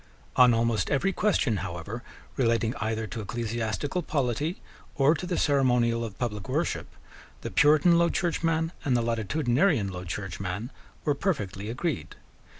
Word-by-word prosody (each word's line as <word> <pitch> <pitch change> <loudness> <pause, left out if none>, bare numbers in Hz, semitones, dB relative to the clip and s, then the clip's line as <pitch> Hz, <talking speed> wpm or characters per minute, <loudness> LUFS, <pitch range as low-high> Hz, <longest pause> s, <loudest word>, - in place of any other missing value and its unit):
On 125 -1 +7
almost 115 -4 +1
every 190 +8 +1
question, 145 - +1
however, 95 +5 -5 0.3
relating 115 -2 +1
either 110 0 -2
to 110 +2 -5
ecclesiastical 115 - -2
polity 150 - -1 0.4
or 140 +2 +4
to 180 +2 -4
the 175 - -1
ceremonial 125 -5 +2
of 110 -3 -6
public 105 -5 -3
worship, - - -1 0.5
the - - -5
Puritan 155 +3 +5
Low 170 0 +4
Churchman 165 -2 0
and 130 -4 +2
the 120 - 0
Latitudinarian 120 - +1
Low 90 0 -6
Churchman 95 +4 -4 0.3
were 145 - +3
perfectly 105 - -2
agreed. 150 +7 -3
120 Hz, 140 wpm, -27 LUFS, 110-150 Hz, 0.5 s, On